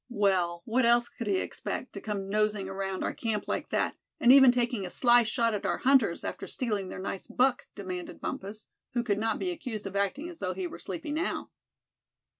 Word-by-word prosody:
"Well, 185 -6 +1
what 250 +3 +2
else 240 0 +4
could 230 - -7
he 195 -2 +2
expect, 250 - -4
to 200 - -7
come 200 -3 -3
nosing 210 -1 0
around 195 0 -3
our - - -1
camp 220 -3 -2
like - - -2
that, - - 0 0.2
and 240 - +6
even 265 -2 +9
taking 240 -3 0
a 180 - -4
sly 240 +4 +5
shot 230 0 +1
at 205 - -2
our - - 0
hunters, 255 -10 +3
after - - -5
stealing 210 -7 -2
their - - -6
nice 190 0 -5
buck?" 245 +2 +1
demanded 185 -3 -6
Bumpus, 205 +3 -5 0.3
who 240 -1 +1
could 205 -4 0
not 225 +1 0
be 365 - -1
accused 245 -11 -5
of 195 0 -6
acting 200 - 0
as 345 -1 -10
though 185 -1 -2
he 190 -1 -3
were - - -7
sleepy 190 - -5
now. 320 +5 -2
215 Hz, 210 wpm, -29 LUFS, 195-245 Hz, 0.3 s, even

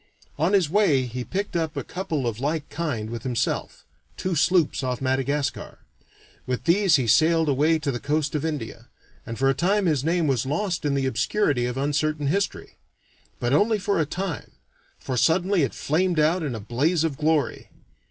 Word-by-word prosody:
On 165 +6 +2
his 190 -5 +4
way 160 -7 +3
he 125 0 -5
picked 195 +6 -4
up 165 -2 -1
a 140 - -2
couple 160 -6 -3
of 115 -2 -2
like 150 +2 -2
kind 145 -9 -3
with 120 - -5
himself 125 -4 -2 0.3
two 185 - -2
sloops 170 -1 +2
off 125 -2 -2
Madagascar. 135 +2 -1 0.7
With 125 -1 -2
these 180 +3 +4
he 130 - +1
sailed 160 +7 +4
away 150 +4 +3
to 150 -2 -2
the 120 - -4
coast 145 +2 -1
of 150 -1 -1
India, 150 -8 -5 0.4
and 115 - -5
for 135 - +2
a 135 - +4
time 190 +8 +1
his 150 -6 +1
name 165 +1 +1
was 135 -6 +1
lost 165 +5 -2
in 140 -1 +1
the 135 -1 0
obscurity 130 - +1
of 125 +1 -4
uncertain 150 +2 0
history. 195 +8 -2 0.6
But 120 +2 0
only 215 +8 +3
for 200 -2 0
a 155 - +1
time, 180 -1 -5 0.4
for 130 - -4
suddenly 180 +6 +2
it 135 - -1
flamed 175 +3 0
out 160 +4 +3
in 140 -6 -3
a - - -5
blaze 145 - 0
of 160 -4 -1
glory. 155 -1 0
150 Hz, 185 wpm, -24 LUFS, 130-170 Hz, 0.7 s, his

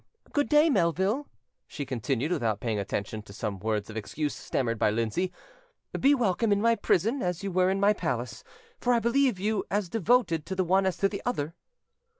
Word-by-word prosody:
"Good 290 -1 +1
day, 300 +1 +6
Melville," 190 - +1 0.4
she 145 - -5
continued, 130 +3 -2
without 110 - 0
paying 110 -3 -1
attention 100 +2 -3
to 100 -1 -13
some 100 -2 -4
words 105 0 -1
of 110 - -9
excuse 140 +8 -3
stammered 115 -4 -2
by - - +3
Lindsay; 115 - -1 0.7
"be 280 +2 +5
welcome 225 -2 +1
in 200 - +3
my 230 +2 +4
prison, 230 - +1
as 180 0 -2
you 195 - -2
were 185 +1 +3
in 195 +1 0
my 200 +1 +4
palace; 125 - -3 0.4
for 245 0 +2
I - - +3
believe 235 -2 +2
you 210 +1 0
as 200 -2 -1
devoted 210 -6 +2
to 190 - -3
the 190 - +1
one 190 +2 +3
as 190 - -1
to 195 - +3
the 200 0 -5
other". 165 -11 -2
180 Hz, 195 wpm, -28 LUFS, -, 0.7 s, day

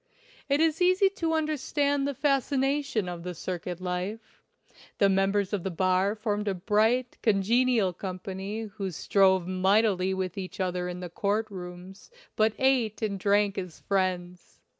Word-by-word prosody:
It 280 +1 +3
is 320 +1 +2
easy 370 +2 +4
to 330 -4 -2
understand 290 -2 0
the 285 - -3
fascination 275 -4 0
of 175 -1 -5
the 180 +1 -6
circuit 180 +1 -5
life. 185 +5 -5 0.6
The 200 - +4
members 195 +1 +1
of 205 - 0
the 190 - -2
bar 185 +3 +1
formed 210 -1 -2
a 195 - 0
bright, 220 +6 +1
congenial 220 0 +2
company 190 +3 -5
who 200 -3 -5
strove 190 +1 +2
mightily 190 0 +2
with 185 0 -3
each 185 0 -7
other 180 -1 -1
in 180 0 -6
the 180 - -6
court 210 +4 -1
rooms, 180 +1 -9 0.3
but 215 0 +3
ate 250 -5 +1
and 200 -2 -1
drank 200 0 +2
as 180 -4 -8
friends. 180 -2 -2
200 Hz, 150 wpm, -28 LUFS, 185-230 Hz, 0.6 s, easy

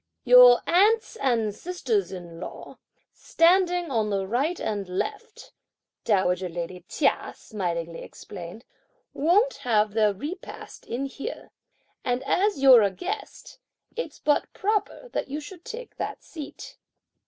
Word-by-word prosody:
"Your 245 -1 +8
aunts 430 +6 +3
and 230 - +1
sisters 365 - -2
in 175 -3 -9
law, - - -9 0.3
standing 350 -1 +2
on 220 -4 +1
the 195 -1 -1
right 270 - -1
and 205 -4 -3
left," 425 - -5 0.5
dowager 185 -4 +1
lady 175 +1 -6
Chia - - 0
smilingly 170 -5 -4
explained, 175 +8 -10 0.5
"won't 385 - +2
have 215 -3 +1
their 215 -1 +3
repast 290 - -8
in 250 +4 -3
here, 275 0 -7 0.5
and 245 0 -1
as 400 -3 +1
you're 265 -4 +8
a 200 - +3
guest, 380 - -7 0.4
it's 485 - -5
but 295 - +1
proper 425 +4 -1
that - - -3
you 285 +3 -4
should 350 +3 -11
take 485 0 -9
that - - -5
seat." 305 -4 -10
255 Hz, 130 wpm, -26 LUFS, -, 0.5 s, Your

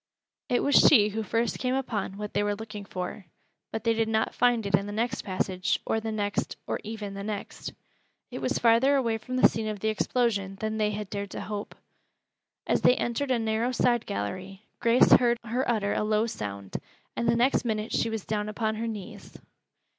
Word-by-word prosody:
It 245 - +2
was 285 - +1
she 210 -7 +7
who 220 +2 -3
first 230 +2 -1
came 255 0 0
upon 215 -7 -2
what 210 0 -5
they 205 - +2
were 205 0 0
looking 215 -1 -8
for; 185 0 -6 0.4
but 220 - -4
they 230 -1 +3
did 225 0 +1
not 220 0 0
find 240 -3 +2
it 200 - -3
in 200 +1 +3
the - - -5
next 230 +2 -1
passage, 185 -1 -1
or 220 - +1
the 220 0 -4
next, 205 -1 -2
or - - -2
even 215 -2 -6
the 200 - -6
next. 210 -1 -5 0.6
It - - -5
was - - 0
farther 240 +4 +4
away 230 -5 +1
from 255 +3 -5
the 255 - +7
scene 220 -1 -4
of 210 -1 -3
the 220 - 0
explosion 215 -3 0
than 220 0 -2
they 210 -1 +2
had 210 -1 -5
dared 200 -1 -3
to - - -6
hope. 205 -1 -5 0.9
As - - +1
they 250 - +6
entered 245 +4 -1
a 255 - +3
narrow 225 +2 0
side 240 -1 +1
gallery, 185 - -4 0.2
Grace 235 +1 +5
heard 240 -1 +6
her 240 +3 -1
utter 210 -4 +1
a - - 0
low 215 +1 +2
sound, 100 - -5 0.4
and 235 - -1
the 230 - +4
next 245 +3 +3
minute 220 -2 -2
she - - +1
was 225 -3 -4
down 210 -1 -2
upon 220 0 -1
her 230 +1 -2
knees. 210 -4 -8
220 Hz, 205 wpm, -27 LUFS, 205-235 Hz, 0.9 s, she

